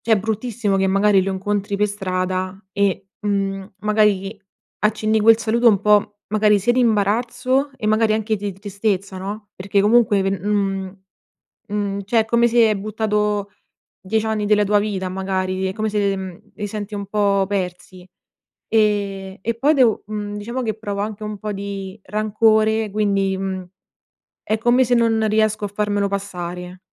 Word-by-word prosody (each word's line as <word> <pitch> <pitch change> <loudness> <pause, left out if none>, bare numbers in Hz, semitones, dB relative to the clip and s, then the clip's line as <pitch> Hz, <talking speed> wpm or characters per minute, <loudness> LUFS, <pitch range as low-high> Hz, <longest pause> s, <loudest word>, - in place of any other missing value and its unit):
cioè 225 - 0
è 210 - +5
bruttissimo 220 0 -1
che 195 0 +2
magari 195 0 +3
lo 195 +1 -2
incontri 200 +1 -2
per 210 +1 +2
strada, 185 -1 -3
e, 195 -1 0
mhmm, 195 -1 -2
magari 210 -1 +1 0.4
accenni 215 +1 +1
quel 225 +1 +6
saluto 230 +1 +3
un 200 -3 +3
po', 210 0 +3
magari 210 0 +3
sia 205 +5 +2
di 255 - +2
imbarazzo 245 +5 +1
e 225 -4 -4
magari 215 0 +3
anche 220 0 0
di 200 0 -4
tristezza 200 -1 -3
no? 205 +2 -6
Perché 195 +1 0
comunque 210 -1 +4
pe 195 - 0
mhmm, 195 -1 -2 0.7
mhmm, 200 -1 -2
cioè 225 +3 +2
è 220 - +1
come 235 +1 +3
se, 230 -1 +4
hai 215 - +1
buttato 210 0 -1 0.5
10 215 +4 -1
anni 215 -1 -1
della 210 0 +3
tua 205 +1 +3
vita 195 -3 -2
magari, 190 0 -2
è 190 - -2
come 215 +1 -2
se, 205 -2 +1
mhmm, 190 -1 -7 0.2
li 205 - -4
senti 210 0 -5
un 200 -1 -4
po' 200 -1 +2
persi. 185 -1 -5 0.6
E 200 -3 0
e 230 +4 -1
poi 285 +6 +3
devo 250 -6 +3
mhmm, 210 -1 -5
diciamo 235 +5 -4
che 220 -3 -2
provo 205 -2 -4
anche 215 0 -4
un 210 -1 -5
po' 210 +1 -4
di 195 0 -6
rancore 215 +1 +2
quindi, 195 -2 +1
mhmm, 190 -1 -4 0.8
è 215 - 0
come 240 +3 +3
se 245 0 +2
non 225 -2 +2
riesco 215 0 +1
a - - -5
farmelo 205 0 -1
passare. 180 -2 -5
205 Hz, 170 wpm, -21 LUFS, 195-215 Hz, 0.8 s, quel